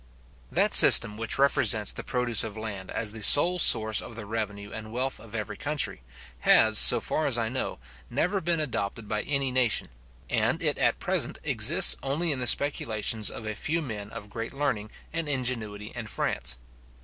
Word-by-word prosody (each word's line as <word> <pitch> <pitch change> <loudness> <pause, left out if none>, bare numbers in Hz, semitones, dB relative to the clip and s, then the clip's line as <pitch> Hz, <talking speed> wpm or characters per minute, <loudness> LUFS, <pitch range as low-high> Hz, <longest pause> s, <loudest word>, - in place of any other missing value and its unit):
That - - 0
system 105 -2 +9
which 115 0 -1
represents 125 -6 +1
the - - -8
produce 125 -3 0
of 110 -1 -9
land 100 -4 -8
as 110 -2 -3
the 110 0 -10
sole 175 - +5
source 110 -7 +5
of 115 - -12
the 115 -2 -9
revenue 105 -1 -6
and 110 0 -10
wealth 130 +3 -4
of 115 -1 -13
every 110 -1 -6
country, 145 - -4 0.4
has - - +4
so - - +7
far 155 - -2
as 125 -4 0
I 115 -1 -3
know, 130 +2 -5 0.3
never 195 +3 -3
been 170 -1 -2
adopted 115 -7 -5
by 105 0 -4
any 140 -2 -3
nation, 125 -3 -1 0.4
and - - -2
it - - -2
at - - 0
present - - -3
exists - - +4
only 155 +5 -2
in 140 - -2
the 125 - -2
speculations 110 -6 +1
of 110 - -9
a 110 - -5
few 160 +10 -4
men 105 -9 -8
of 105 -1 -12
great 115 +3 -7
learning 115 -7 -4 0.2
and 165 -2 -4
ingenuity 115 -6 -4
in 120 -3 -8
France. 65 -10 -5
115 Hz, 185 wpm, -25 LUFS, 105-135 Hz, 0.4 s, system